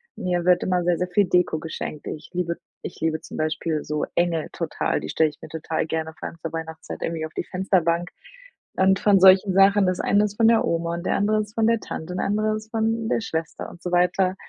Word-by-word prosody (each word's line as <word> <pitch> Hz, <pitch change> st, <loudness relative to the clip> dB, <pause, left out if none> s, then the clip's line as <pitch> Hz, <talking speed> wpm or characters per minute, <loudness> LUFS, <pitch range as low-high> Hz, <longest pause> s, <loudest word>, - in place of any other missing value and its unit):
Mir 175 Hz, -1 st, -2 dB
wird 180 Hz, -1 st, +4 dB
immer 180 Hz, -1 st, +1 dB
sehr, 175 Hz, 0 st, +2 dB
sehr 180 Hz, -, 0 dB
viel 195 Hz, +3 st, +2 dB
Deko 180 Hz, -2 st, +2 dB
geschenkt. 155 Hz, -1 st, -6 dB
Ich 150 Hz, -, -7 dB
liebe 175 Hz, -1 st, -2 dB, 0.2 s
ich -, -, -8 dB
liebe 160 Hz, -1 st, -1 dB
zum -, -, -9 dB
Beispiel 155 Hz, 0 st, -1 dB
so 150 Hz, 0 st, -2 dB
Engel 170 Hz, -2 st, 0 dB
total. 165 Hz, -2 st, -2 dB
Die -, -, -7 dB
stelle 160 Hz, -1 st, +2 dB
ich 150 Hz, -, -17 dB
mir -, -, -9 dB
total 160 Hz, 0 st, -3 dB
gerne 160 Hz, 0 st, -3 dB
vor -, -, -4 dB
allem -, -, -10 dB
zur 165 Hz, -, -4 dB
Weihnachtszeit 160 Hz, -1 st, -6 dB
irgendwie 165 Hz, -1 st, -2 dB
auf 160 Hz, -, -10 dB
die -, -, -4 dB
Fensterbank. 175 Hz, -2 st, 0 dB, 0.7 s
Und 190 Hz, +1 st, +3 dB
von 200 Hz, -2 st, +4 dB
solchen 190 Hz, +1 st, +6 dB
Sachen 195 Hz, +1 st, +5 dB
das 185 Hz, -1 st, 0 dB
eine 205 Hz, +1 st, +3 dB
ist 205 Hz, -1 st, -5 dB
von 225 Hz, +1 st, +4 dB
der 230 Hz, -1 st, +4 dB
Oma 170 Hz, 0 st, -1 dB
und 170 Hz, +1 st, -6 dB
der -, -, +1 dB
andere 215 Hz, +1 st, +2 dB
ist 210 Hz, 0 st, -8 dB
von 225 Hz, -1 st, +2 dB
der 230 Hz, 0 st, +3 dB
Tante 175 Hz, -3 st, -6 dB
und -, -, -4 dB
der -, -, -1 dB
andere 215 Hz, +1 st, +1 dB
ist 215 Hz, 0 st, -8 dB
von 225 Hz, 0 st, 0 dB
der 230 Hz, -, 0 dB
Schwester 160 Hz, -6 st, -4 dB
und 175 Hz, -, -14 dB
so 180 Hz, -, -3 dB
weiter. 180 Hz, +1 st, +2 dB
180 Hz, 240 wpm, -24 LUFS, 165-200 Hz, 0.7 s, solchen